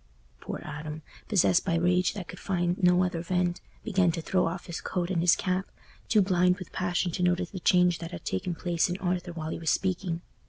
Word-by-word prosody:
Poor - - -6
Adam, 150 +1 -6 0.2
possessed 185 -3 +3
by 170 -4 0
rage 180 +2 +2
that 190 -4 -6
could 180 - -9
find 175 0 -1
no 180 0 +5
other 175 -2 -1
vent, 175 0 0 0.2
began 190 -5 +2
to 165 - -4
throw 180 +2 +1
off 170 +2 -4
his 170 - -5
coat 180 0 -2
and 170 -3 +1
his 175 0 +5
cap, 185 +1 -1 0.4
too 210 -3 +4
blind 180 -1 +3
with 185 - -9
passion 180 0 -1
to 170 - -3
notice 180 0 +1
the 190 - -5
change 180 -1 +3
that 165 - -6
had 170 -2 -9
taken 165 - -2
place 170 +1 0
in 175 - -2
Arthur 180 -1 -2
while 160 -2 -5
he - - -4
was 165 -2 -1
speaking. 180 -2 -1
180 Hz, 220 wpm, -28 LUFS, 170-185 Hz, 0.4 s, no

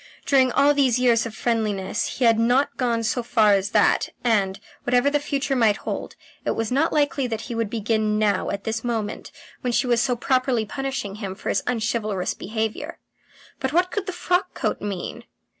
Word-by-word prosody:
During 260 -2 +4
all 290 +1 +5
these 265 -4 +3
years 235 -2 +3
of 220 - -10
friendliness 215 -2 -1
he 255 - +2
had 225 -1 +5
not 245 +5 +2
got 235 -3 0
so 245 - 0
far 220 -3 +3
as 195 0 +1
that, - - +3
and, 200 -5 +1 0.2
whatever 245 +3 +2
the 290 - +2
future 280 -1 -1
might 225 -4 +3
hold, - - -5 0.3
it - - -1
was 225 0 -2
not 285 +6 +2
likely 285 -3 +1
that 225 -2 -3
he 235 - -6
would 230 -2 -1
begin 215 -1 0
now 210 -1 +1
at 200 0 -4
this 225 0 -3
moment 225 -4 -3 0.3
when 250 - -1
she 240 - +1
was 240 -2 +2
so 250 -2 +1
properly 255 -2 +1
punishing 270 -5 -4
him 195 -3 -5
for - - -5
his 195 - +1
unchivalrous 220 -5 -1
behaviour. 220 - -4 0.6
But 265 +2 -2
what 360 +2 +2
could 410 -2 -3
the - - -1
frock 360 +1 -1
coat - - -2
mean? 200 -3 -5
235 Hz, 190 wpm, -23 LUFS, 215-265 Hz, 0.6 s, all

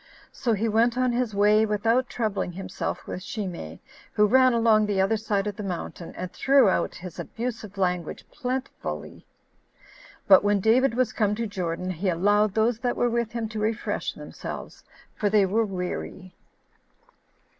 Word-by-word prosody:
So 235 -3 -1
he 215 +2 0
went 230 +3 +2
on 255 -1 +2
his 240 -3 -1
way 210 +2 +4
without 225 +4 +1
troubling 215 -6 -2
himself 185 0 -5
with 180 - -6
Shimei, 180 - -6 0.3
who 210 -1 +4
ran 255 +4 +5
along 225 -2 +3
the 200 -2 0
other 195 +4 +3
side 210 -2 -1
of 205 -2 -3
the - - -5
mountain, 180 -3 -5
and 180 0 -5
threw 270 -4 +4
out - - 0
his 180 -1 -9
abusive 225 -4 -5
language 180 -3 -2
plentifully. 260 -1 -5 1.0
But 190 -1 +7
when 205 0 +2
David 230 +4 +3
was 250 -3 +1
come 210 -2 +1
to 230 +1 -2
Jordan, 180 -3 -3
he 185 +2 -1
allowed 205 +4 +2
those 225 +1 +2
that 245 -1 -1
were 240 - +2
with 235 -1 -1
him 230 -2 -2
to 215 0 -5
refresh 220 +1 -2
themselves; - - -8 0.3
for 205 - 0
they 205 -1 +4
were 215 +4 +1
weary. 185 0 -5
210 Hz, 165 wpm, -25 LUFS, 190-230 Hz, 1.0 s, But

